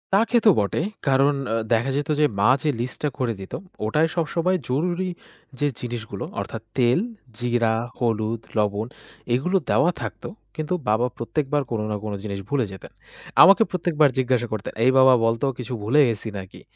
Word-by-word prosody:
তা - - +6
খেতো 235 -2 +5
বটে। 100 -1 0 0.3
কারণ 135 +2 +4 0.2
আ - - +1 0.2
দেখা 120 +3 +2
যেত 145 +2 -3
যে 150 - +5
মা 100 - +4
যে 155 - 0
লিস্টটা 130 +5 -2
করে 120 -3 0
দিতো, 95 - -6 0.3
ওটায় 155 +9 +2
সবসময় 170 +2 +1
জরুরি 175 +7 0 0.5
যে 145 - +2
জিনিসগুলো 115 -5 -5
অর্থাৎ 110 +3 -5 0.2
তেল, 125 +3 +4 0.4
জিরা, 120 -2 +1 0.3
হলুদ, 115 -1 0 0.2
লবণ 105 +1 0 0.5
এগুলো 180 +10 +2
দেওয়া 150 +6 +4
থাকত। - - -6 0.3
কিন্তু 155 +2 -2 0.2
বাবা 110 +3 +3
প্রত্যেকবার 135 +5 -1
কোন 115 - -1
না - - 0
কোন 105 -1 -4
জিনিস 100 -2 -4
ভুলে 135 -4 +1
যেতেন। 95 - -11 0.5
আমাকে 195 +4 +8
প্রত্যেকবার 160 -5 +2
জিজ্ঞাসা 125 -2 +1
করতেন, 105 -2 -4
“এই 130 - +5
বাবা 130 0 +7
বলত 115 +2 0 0.2
কিছু 125 0 -5
ভুলে 130 +8 +4
গেছি 115 0 -4
নাকি?" 95 -1 -10
125 Hz, 165 wpm, -23 LUFS, 110-150 Hz, 0.5 s, আমাকে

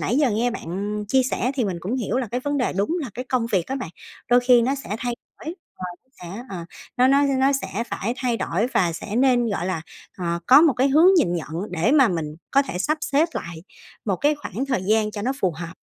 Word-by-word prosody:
nãy 245 - 0
giờ 285 -5 +3
nghe 230 +4 +1
bạn 205 +1 -4
chia 265 +4 +4
sẻ, 255 0 -1
thì 255 - 0
mình 190 -4 -2
cũng 210 +9 -2
hiểu 245 -1 -2
là 255 - -1
cái 245 - -2
vấn 285 +2 -1
đề 250 - 0
đúng 200 +6 -1
là 255 - -5
cái 250 +2 -5
công 250 -3 +1
việc 185 -4 +1
á 270 - -3
bạn, 255 -11 -5 0.4
đôi 245 - +6
khi 245 -1 +5
nó 265 +4 +1
sẽ 265 -6 -5
thay 245 0 -2 0.3
đổi 320 +3 -5 0.4
và 175 - -9
nó 260 - -39 0.2
sẽ, 235 - -6
ờ, 190 - -5 0.4
nó 250 +1 +5
nó 280 +2 +4 0.2
nó 270 +1 +4
sẽ 230 +5 -3
phải 235 0 -3
thay 245 -3 0
đổi, 205 +5 0
và 175 -3 +2
sẽ 210 +6 -5
nên, 245 -2 +3
gọi 185 -3 -2
là, 175 -4 -2 0.4
ờ, 170 -1 -1
có 270 +3 +8
một 320 -4 +5
cái 265 +2 +2
hướng 325 +7 +6
nhìn 175 - +3
nhận 165 -3 -4 0.2
để 180 - +1
mà 270 -5 +6
mình 155 -4 -3
có 275 +1 +4
thể 180 -9 -5
sắp 305 +10 0
xếp 305 +3 +2
lại 170 -1 -6 0.4
một 195 -4 0
cái 295 - +2
khoảng 275 -3 -5
thời 255 -8 -1
gian 215 +1 +2
cho 205 -1 -5
nó 255 - 0
phù 185 -3 +2
hợp. 170 0 -6
240 Hz, 255 wpm, -23 LUFS, 190-265 Hz, 0.4 s, có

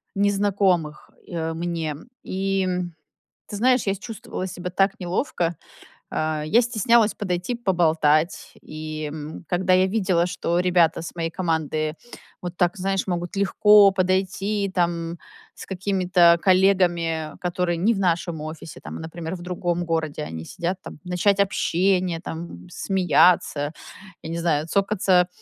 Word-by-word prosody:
незнакомых, 195 -6 +1 0.2
э, 165 -1 -3
мне. 165 -2 -3 0.3
И, 195 0 -1
м, 180 -2 -3 0.5
ты - - -7
знаешь, 255 +3 +3
я 195 - +2
с 195 - -8
чувствовала 225 -4 -6
себя 180 0 -6
так 195 +2 +1
неловко. 175 -2 -1 0.6
Э, 155 -1 -1
я 220 +10 +4
стеснялась 230 -1 +3
подойти, 180 +4 -2
поболтать. 165 -6 +1
И, 155 0 -6
м, 155 +2 -7
когда 185 +1 +1
я 185 +1 +5
видела, 185 -4 +1
что 175 -1 -1
ребята 175 -3 +3
с 170 - -8
моей 165 -1 -2
команды 155 -3 -1 0.5
вот 175 0 -6
так, 175 +2 +1
знаешь, 195 +1 -1
могут 175 0 -3
легко 200 +1 +6
подойти, 190 +2 0
там, 170 -1 -1 0.4
с - - -9
какими-то 180 -3 +3
коллегами, 175 -4 +2
которые 180 -1 -1
не 210 +7 +2
в - - -3
нашем 170 -3 0
офисе, 155 0 -8
там, - - -7
а - - -9
например, 165 +1 -6
в 175 - -10
другом 175 -1 -2
городе. 160 - -2
Они 80 +1 -7
сидят 180 - -3
там, - - -10
начать 185 +2 +1
общение, 185 -3 +1
там, 160 - -8
смеяться, 175 - +2 0.5
я 160 - -6
не 165 - -3
знаю, 160 -2 0
цокаться 195 -1 +2
180 Hz, 140 wpm, -23 LUFS, 165-195 Hz, 0.6 s, легко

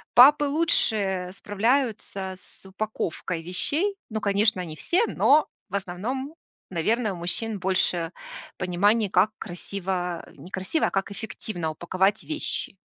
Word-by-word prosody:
папы 290 +4 +8
лучше 210 - +1
справляются 205 -3 -1
с - - -20
упаковкой 185 -4 -3
вещей. 300 - +1
Ну, 220 -1 -3
конечно, 200 -1 +2
не 155 -2 -7
все, 360 - +2
но, 300 +1 +4 0.2
в 195 - -4
основном, 220 - -3 0.4
наверно, 215 +6 +1
у 180 - -7
мужчин 205 +5 -2
больше 180 -2 +1 0.5
понимания, 200 +4 +2
как 195 +4 +4
красиво 180 -1 -4
не 180 - -11
красиво, 190 - 0
а - - -4
как 195 +1 -1
эффективно 200 -5 -4
упаковать 185 +6 +1
вещи. 310 -9 -3
200 Hz, 125 wpm, -26 LUFS, 180-230 Hz, 0.5 s, папы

